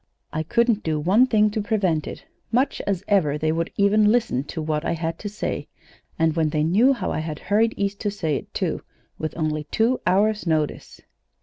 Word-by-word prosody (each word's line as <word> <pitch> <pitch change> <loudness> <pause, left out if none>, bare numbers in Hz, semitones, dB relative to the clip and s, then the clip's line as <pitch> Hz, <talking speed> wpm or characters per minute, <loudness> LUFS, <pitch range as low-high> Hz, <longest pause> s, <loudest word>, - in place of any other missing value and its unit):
I 155 - -1
couldn't 230 +6 +1
do 155 -2 -1
one 200 +11 +4
thing 215 -3 +3
to 215 - -2
prevent 195 -8 0
it. - - -8 0.3
Much 255 +4 +1
as 195 -2 -1
ever 185 -8 +3
as 150 - -5
they 155 0 +2
would 165 +1 -1
even 210 +1 +4
listen 230 - +1
to 160 - -6
what 155 0 -1
I - - 0
had 165 0 -3
to 205 - -5
say 210 - -4 0.5
and 160 -1 +2
when 160 -2 +2
they 150 0 0
knew 215 - +4
how 255 - -3
I - - -2
had 155 -1 -4
hurried 220 +6 +1
East 200 0 -2
to 210 - -1
say 165 -7 -2
it, - - -10
too, - - -2 0.4
with 155 +1 -4
only 155 -2 -1
two 225 +10 +1
hours' 205 +2 +2
notice! 155 -2 -2
185 Hz, 210 wpm, -23 LUFS, 155-215 Hz, 0.5 s, one